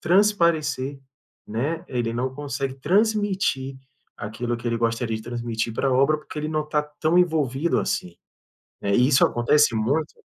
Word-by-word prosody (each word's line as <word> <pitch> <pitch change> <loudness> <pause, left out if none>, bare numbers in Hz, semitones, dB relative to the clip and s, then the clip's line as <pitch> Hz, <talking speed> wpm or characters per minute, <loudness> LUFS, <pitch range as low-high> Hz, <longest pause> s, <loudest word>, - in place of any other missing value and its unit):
transparecer, 165 -8 +2 0.5
né, 140 +10 -2
ele 120 -3 -1
não 130 +2 -1
consegue 140 -2 -3
transmitir 190 -5 +1 0.4
aquilo 120 +3 -3
que 120 0 -8
ele 115 - 0
gostaria 115 -1 0
de 110 - -8
transmitir 115 -1 -3
pra 135 +1 +1
obra, 140 +4 +4
porque 150 - -9
ele 155 +1 -2
não 155 -1 0
está 150 0 0
tão 155 +3 0
envolvido 155 -3 +1
assim, 90 -1 -3 0.7
né, 100 0 +1
e 125 +1 +4
isso 135 -2 +4
acontece 120 +2 +3
muito 145 +9 -1
135 Hz, 150 wpm, -24 LUFS, 120-155 Hz, 0.7 s, obra